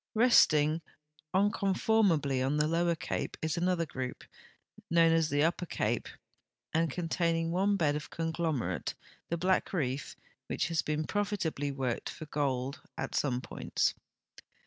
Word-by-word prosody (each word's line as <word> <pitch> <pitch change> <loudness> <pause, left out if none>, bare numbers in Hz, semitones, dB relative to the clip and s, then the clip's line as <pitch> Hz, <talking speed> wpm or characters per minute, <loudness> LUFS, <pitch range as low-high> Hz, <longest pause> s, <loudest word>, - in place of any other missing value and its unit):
Resting 160 -10 +5 0.5
unconformably 190 - +2
on 140 +3 +1
the 150 - +3
Lower 170 +1 +2
Cape - - -3
is 160 +1 -1
another 175 -1 +1
grou]) 130 -4 -4 0.7
known 165 -1 +5
as 165 -1 +2
the 145 +1 +2
Upper 175 +2 0
Cai)e - - 0 0.7
and 165 0 +2
containing 165 +1 0
one 195 +3 +2
bed 145 -5 +2
of 150 - -5
conglom 165 -4 -1
erate, 90 - -3 0.3
the 170 - 0
Black 185 +2 +1
Reef, 140 -5 -2 0.3
which - - -1
has 165 -2 +1
been 155 +1 -1
profitabl}'' 170 -9 -1
worked 130 -3 -2
for 155 - -7
gold 140 -2 -2 0.2
at - - -4
.some 125 -3 0
points. - - -1
160 Hz, 140 wpm, -31 LUFS, 145-175 Hz, 0.7 s, Resting